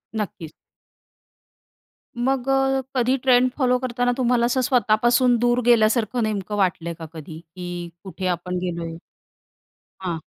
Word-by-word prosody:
नक्कीच. 175 -7 -5 1.7
मग 260 +1 0
अ, 270 0 +2
कधी 255 +1 +2
ट्रेंड 255 -1 +4
फॉलो 250 -2 +2
करताना 245 -1 0
तुम्हाला 240 -2 +2
असं 255 +2 +1
स्वतःपासून 240 0 +3
दूर 240 +1 +2
गेल्यासारखं 230 0 +3
नेमकं 210 -1 -2
वाटल 175 -4 0
आहे 170 - -4
का 160 - -6
कधी, 160 0 -9
की 175 +1 -7
कुठे 190 -1 -5
आपण 180 +1 -2
गेलो 175 -2 -3
आहे? 165 - -7 1.1
हां. 170 -3 -2
225 Hz, 135 wpm, -22 LUFS, 180-250 Hz, 1.7 s, ट्रेंड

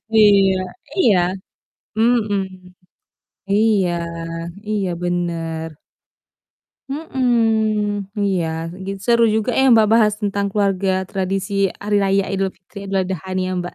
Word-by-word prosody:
Iya, 200 -3 +6 0.4
iya. 230 - +4 0.8
Mhm. 225 -3 +2 1.2
Iya 205 -3 +3 0.8
iya, 205 -3 -1
bener. 165 -2 -2 1.2
Mhm, 220 -8 0
iya, 190 -4 +1 0.4
gi 195 - -4
seru 235 -1 +4
juga 220 +2 0
ya - - +4
Mbak, 220 -2 +6
bahas 220 -2 +5
tentang 200 -1 -1
keluarga, 195 -2 +1 0.2
tradisi 195 +1 -2 0.3
Hari 205 0 0
Raya 195 0 +2
Idul 195 -1 -1
Fitri, 185 +3 -14
Idul 195 -1 0
Adha 185 -2 -4
nih 185 - 0
ya - - -2
Mbak. 175 - -6
200 Hz, 115 wpm, -20 LUFS, 190-220 Hz, 1.2 s, Iya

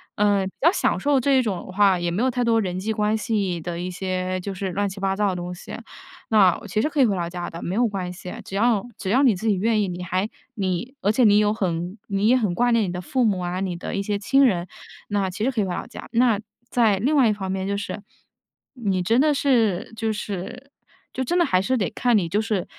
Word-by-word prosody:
呃， 205 -2 +2
比 - - -9
较 335 +4 +6
享 - - 0
受 285 -2 +2
这 270 +1 +3
一 - - +4
种 205 -6 -2
的 - - -9
话， 195 -3 +4
也 175 0 -1
没 195 +8 -1
有 260 - +2
太 245 0 -1
多 230 -1 +3
人 185 -1 -3
际 220 +3 -2
关 210 0 +1
系 200 -6 -1
的 170 +1 -5
一 180 +1 -4
些 185 0 -2
就 195 +2 -5
是 190 0 -3
乱 200 +2 -1
七 195 +1 -9
八 195 0 0
糟 205 +1 +1
的 185 - -2
东 175 0 -5
西， 180 - -8 0.5
那 195 -5 +5
其 215 +3 0
实 300 - 0
可 295 -1 -3
以 255 - +7
回 205 - +1
老 170 -2 -2
家 175 0 -5
的， 165 - -8
没 180 - -3
有 240 +2 +3
关 185 -3 -4
系， 180 0 -8
只 195 - -7
要 230 +1 +2
只 190 - -4
要 255 +6 +4
你 235 -7 +5
自 220 +5 -4
己 205 - +3
愿 215 +2 +1
意。 - - -1
你 180 0 -5
还 185 +3 -1 0.3
你 200 +6 -2
而 205 - +3
且 245 +2 +3
你 205 -1 +6
有 210 0 +2
很 180 -1 -2
你 200 +1 +1
也 255 +3 +5
很 205 -7 0
挂 245 +3 +2
念 230 -2 +3
你 175 - -3
的 180 - -4
父 255 +7 0
母 200 -4 +1
啊、 180 +1 -3
你 185 -2 -2
的 170 - -6
一 200 - 0
些 205 0 -1
亲 270 +7 +3
人， 180 -6 +1 0.4
那 200 -2 0
其 200 +4 -5
实 265 - +2
可 230 -5 0
以 - - 0
回 180 - -3
老 - - -4
家。 230 - -10
那 235 -3 +3 0.3
在 220 -5 +3
另 270 +10 +1
外 265 -5 +5
一 - - +2
方 190 -2 -4
面 190 0 -2
就 200 - -1
是， 205 0 -5 0.7
你 195 -8 -1
真 230 +8 +3
的 300 -1 +3
是 225 -8 +1
就 220 0 -1
是 210 +7 -6 0.4
就 260 - -2
真 345 +8 0
的 345 - +4
还 185 0 +2
是 255 +7 0
得 195 -6 0
看 245 -3 +2
你， 170 -4 -1
就 205 - +1
是 215 -5 -1
205 Hz, 290 characters per minute, -23 LUFS, 185-230 Hz, 0.7 s, 以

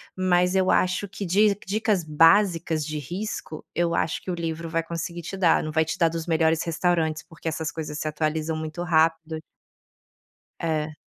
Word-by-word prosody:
mas 180 -1 +2
eu 190 -1 +2
acho 185 +2 +1
que 200 - -5
di 200 +3 +3
dicas 210 -2 0
básicas 165 0 +3
de 155 -1 -4
risco, 175 +1 -5
eu 170 -1 +1
acho 155 - -1
que - - -8
o 175 - -1
livro 165 0 -4
vai 165 0 0
conseguir 170 +1 -5
te 195 - -5
dar, 180 -4 +3
não 155 - -4
vai 160 +1 +3
te 160 - -4
dar 165 -2 +3
dos 165 +1 -5
melhores 160 0 +2
restaurantes 165 -2 0
porque 165 0 -9
essas 160 0 -2
coisas 150 -2 -5
se 155 - -3
atualizam 155 +1 -1
muito 155 +2 -4
rápido. 160 -1 +1 1.2
É. 155 -2 -2
165 Hz, 180 wpm, -25 LUFS, 160-180 Hz, 1.2 s, di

